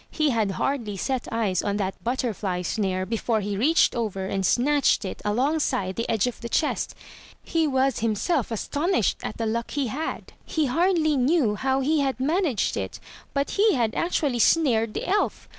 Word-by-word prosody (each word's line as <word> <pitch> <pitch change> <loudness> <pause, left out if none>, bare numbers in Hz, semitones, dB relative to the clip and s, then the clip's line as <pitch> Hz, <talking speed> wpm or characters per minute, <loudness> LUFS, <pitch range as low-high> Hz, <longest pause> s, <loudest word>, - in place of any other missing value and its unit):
He 305 -2 +1
had 215 -4 0
hardly 230 -4 -2
set 260 +5 -2
eyes 220 -5 0
on 205 0 -1
that 195 -2 -3
butterfly 215 -7 -2
snare 185 -1 -1
before 225 +1 0
he 205 0 -3
reached 295 +11 +3
over 210 -5 -2
and 195 0 -2
snatched 275 +3 +2
it 190 - -6
alongside 225 -4 0
the 230 - -3
edge 225 -1 +2
of 245 - -4
the 235 - -5
chest. 305 - 0 0.5
He 325 -1 +1
was 265 -2 +1
him 220 -1 0
self 295 - 0
astonished 295 - 0
at - - -5
the 230 - -2
luck 230 +2 -2
he 285 -2 -1
had. 300 +8 -5
He 315 -2 -1
hardly 320 +2 +2
knew 260 -3 +2
how 265 +5 0
he 305 +3 +2
had 270 -2 0
managed 295 - +1
it 95 -2 -4 0.2
— - - -21
but 280 0 0
he 415 -1 +3
had 230 -4 +1
actually 290 -7 0
snared 230 -7 +3
the - - -3
elf. 410 +3 0
245 Hz, 185 wpm, -25 LUFS, 210-295 Hz, 0.5 s, reached